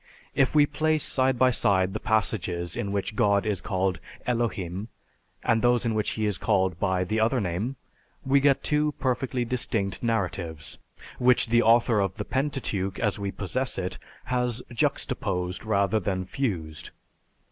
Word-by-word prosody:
If 135 +2 +2
we 145 -1 +7
place 155 +1 0
side 130 -1 +2
by 130 +1 +4
side 95 -4 +2
the 110 - -3
passages 90 -6 -1
in 100 - -3
which 100 +2 -2
God 100 -3 +3
is 105 -4 -1
called 95 -3 -1 0.3
Elohim, 105 -5 -2 0.6
and 115 0 +2
those 120 0 +3
in 115 - +1
which 105 -1 +1
he 110 - -1
is 105 -4 0
called 95 -5 +1
by 95 -1 +1
the 110 +5 -1
other 115 +4 +2
name, 100 +7 -2 0.5
we 135 +1 +4
get 140 0 +3
two 150 0 +1
perfectly 130 -2 -1
distinct 110 -5 -2
narratives, 90 -8 -2 0.4
which 125 -1 +4
the 120 +1 +5
author 115 -1 +4
of 95 -2 0
the - - -4
Pentateuch, 130 -9 -1
as 105 -2 0
we 100 0 -2
possess 130 +8 -3
it, 90 -1 -3 0.2
has 125 0 -1
juxtaposed 90 -4 -1
rather 100 0 +2
than 95 -1 -2
fused. 90 - -3
110 Hz, 160 wpm, -26 LUFS, 95-125 Hz, 0.6 s, we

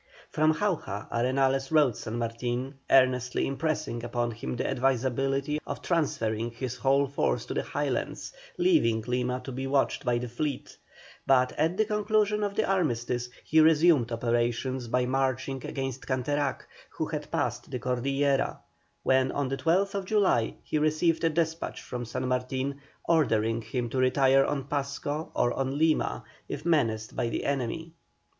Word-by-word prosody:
From 155 +1 +3
Jauja 155 - -2
Arenales 135 +2 +1
wrote 150 -7 +4
San 110 +3 -5
Martin, 120 +3 -2 0.2
earnestly 125 -2 +3
impressing 140 -4 -2
upon 120 0 -1
him 120 +3 -5
the - - -2
advisability 135 +3 0
of - - -5
transferring 115 -9 0
his 120 +1 -5
whole 135 +2 +3
force 140 +1 -1
to - - -5
the - - 0
Highlands, - - -3 0.2
leaving 320 - +3
Lima 125 +1 -1
to 135 - -6
be 130 +1 -4
watched 135 0 +1
by 120 -2 +1
the 125 +1 -3
fleet, 130 +3 -4 0.5
but 130 -1 +4
at 160 +4 0
the 215 - +3
conclusion 210 0 +1
of 200 -1 -2
the - - +1
armistice 125 -9 0
he 160 - +3
resumed 155 -5 +5
operations 120 +2 -1
by 125 +2 +1
marching 130 0 -1
against 135 -2 -4
Canterac, 140 +1 -1 0.3
who - - -3
had - - -5
passed - - -2
the - - -3
Cordillera, 135 +3 0 0.5
when, 130 0 +3
on 140 -2 -1
the 135 - -2
12th 195 +5 +1
July, 185 - +2
he 155 - -1
received 155 +2 +2
a 165 - +4
despatch 160 +1 -1
from 125 -1 -5
San 125 +3 -3
Martin, 130 +2 -2 0.3
ordering 115 -9 +2
him 120 +2 -3
to 130 - -2
retire 135 +1 +4
on 140 -2 -1
Pasco 145 +2 -3
or 120 0 +2
on 135 +1 -2
Lima, 160 0 +1 0.3
if 145 - -5
menaced 115 -10 +1
by 120 - 0
the - - -3
enemy. 140 +4 -2
135 Hz, 155 wpm, -28 LUFS, 125-150 Hz, 0.5 s, resumed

